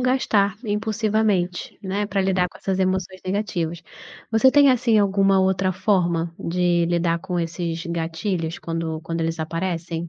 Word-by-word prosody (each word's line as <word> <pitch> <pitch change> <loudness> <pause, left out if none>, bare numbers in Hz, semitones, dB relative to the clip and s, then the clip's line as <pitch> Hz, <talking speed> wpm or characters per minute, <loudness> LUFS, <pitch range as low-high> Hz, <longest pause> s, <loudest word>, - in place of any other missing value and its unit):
gastar 220 -6 +2
impulsivamente, 210 -3 0
né, 200 +2 -2
pra 195 -1 -1
lidar 185 -1 +1
com - - -16
essas 190 -1 -2
emoções 185 0 -1
negativas. 175 -4 -2 0.5
Você 245 +4 +5
tem, 285 0 +6
assim, 230 -3 +3
alguma 195 -1 +3
outra 190 0 +2
forma 170 -4 0
de 175 0 +1
lidar 170 -1 +1
com 180 0 -3
esses 165 0 -3
gatilhos 165 0 -3
quando 165 -1 -4
quando 165 0 -3
eles 165 0 -2
aparecem? 165 +1 -3
185 Hz, 145 wpm, -23 LUFS, 170-200 Hz, 0.5 s, tem